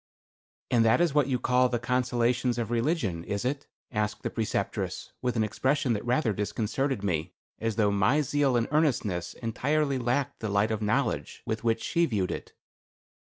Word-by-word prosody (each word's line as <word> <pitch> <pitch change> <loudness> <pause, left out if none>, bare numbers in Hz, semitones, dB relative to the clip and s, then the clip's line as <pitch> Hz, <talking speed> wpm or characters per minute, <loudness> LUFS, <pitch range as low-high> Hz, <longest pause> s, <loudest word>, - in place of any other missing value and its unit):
"And 120 -2 +4
that 110 +5 +4
is 170 -4 +2
what 145 -3 +3
you 130 -2 +1
call 125 +1 +3
the 120 - 0
consolations 125 0 +1
of 115 -1 -2
religion, 115 - 0
is 100 +5 -3
it?" 140 +2 -2 0.2
asked 105 -2 -2
the - - -2
Preceptress 110 -2 -2
with 125 -1 -1
an 110 - +2
expression 130 +4 +1
that 105 - -3
rather 120 -1 +1
disconcerted 110 +4 -1
me; 85 -3 -1 0.2
as 115 -1 -1
though 105 -2 +3
my 100 +9 +3
zeal 140 -2 +2
and 115 - +1
earnestness 115 - 0
entirely 140 +4 0
lacked 125 +3 -1
the 110 - -3
light 100 +2 +2
of 110 -1 -2
knowledge 110 +7 -1
with 110 0 -3
which 115 -1 +1
she 170 -1 +2
viewed 100 -7 -1
it. - - -6
120 Hz, 175 wpm, -28 LUFS, 105-135 Hz, 0.2 s, And